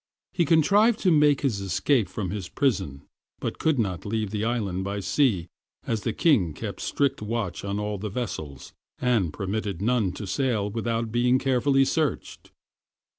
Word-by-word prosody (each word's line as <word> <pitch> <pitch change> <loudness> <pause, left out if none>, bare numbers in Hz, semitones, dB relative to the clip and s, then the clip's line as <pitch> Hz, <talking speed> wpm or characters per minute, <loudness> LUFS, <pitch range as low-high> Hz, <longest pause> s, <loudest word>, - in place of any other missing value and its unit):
He 170 - +2
contrived 205 +9 +4
to 185 - +3
make 150 -3 +4
his 115 -8 0
escape 100 - +1
from 95 -4 -4
his 100 -4 -5
prison, 95 - -1 0.4
but - - -4
could 160 -3 +2
not 95 -7 -1
leave 105 -1 -2
the 105 -1 -2
island 105 -6 -1
by 100 +1 -3
sea, 95 - +1 0.4
as 115 -2 -1
the 115 - -1
king 110 - +2
kept - - -6
strict 140 -5 0
watch 105 -3 -3
on 100 +1 -2
all 105 -1 -3
the 105 +2 -4
vessels, 90 - -5 0.2
and 115 -10 +1
permitted 100 +1 -3
none 110 -2 +1
to 105 - -6
sail 105 -1 0
without 115 0 -2
being 125 +2 +3
carefully 135 +1 +2
searched. 155 -3 -2
110 Hz, 165 wpm, -26 LUFS, 100-135 Hz, 0.4 s, contrived